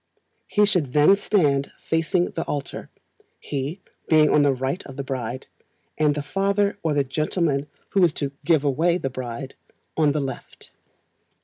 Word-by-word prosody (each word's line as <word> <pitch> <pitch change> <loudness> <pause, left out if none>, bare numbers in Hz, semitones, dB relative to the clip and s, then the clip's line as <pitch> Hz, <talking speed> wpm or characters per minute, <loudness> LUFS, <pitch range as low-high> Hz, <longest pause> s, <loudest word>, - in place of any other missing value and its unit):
He 210 - +1
and 210 - +6
she 195 -3 +4
then 150 +5 +4
stand 150 -9 +1
facing 165 +2 +1
the 165 - -3
altar, 145 -1 -5 0.5
he 145 +7 -4 0.3
being 155 -2 +5
on 150 - +5
the 145 -1 +4
right 135 +7 -2
of 135 - -10
the 140 - -3
bride, 130 -2 -4 0.5
and 150 -1 +2
the 145 - -3
father 200 +4 0
or 160 -3 0
the 140 - +3
gentleman 150 +1 -1 0.2
who 195 - +3
is 170 - +5
to 140 -2 -3
"give 155 -1 +3
away" 160 +5 +2
the 135 -7 -3
bride, 130 +1 -6 0.4
on 155 -2 +3
the 150 - -1
left. 135 -2 -7
150 Hz, 170 wpm, -23 LUFS, 135-175 Hz, 0.5 s, and